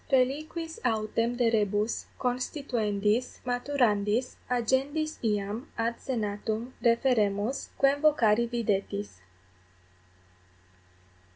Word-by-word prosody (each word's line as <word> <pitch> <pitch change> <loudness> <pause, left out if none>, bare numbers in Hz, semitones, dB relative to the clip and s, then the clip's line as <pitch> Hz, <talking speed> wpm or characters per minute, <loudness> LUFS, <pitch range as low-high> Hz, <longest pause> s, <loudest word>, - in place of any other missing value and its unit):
Reliquis 310 +5 0
autem 230 +1 0
de 240 -1 +2
rebus 210 0 0
constituendis, 245 -4 -1
maturandis, 245 -3 +1
agendis 270 +6 0
iam 210 +4 -1
ad 230 +1 -1
senatum 220 0 -3
referemus, 230 -1 +2
quem 275 +1 +3
vocari 235 -7 +4
videtis. 195 - -2
235 Hz, 75 wpm, -28 LUFS, 210-260 Hz, -, vocari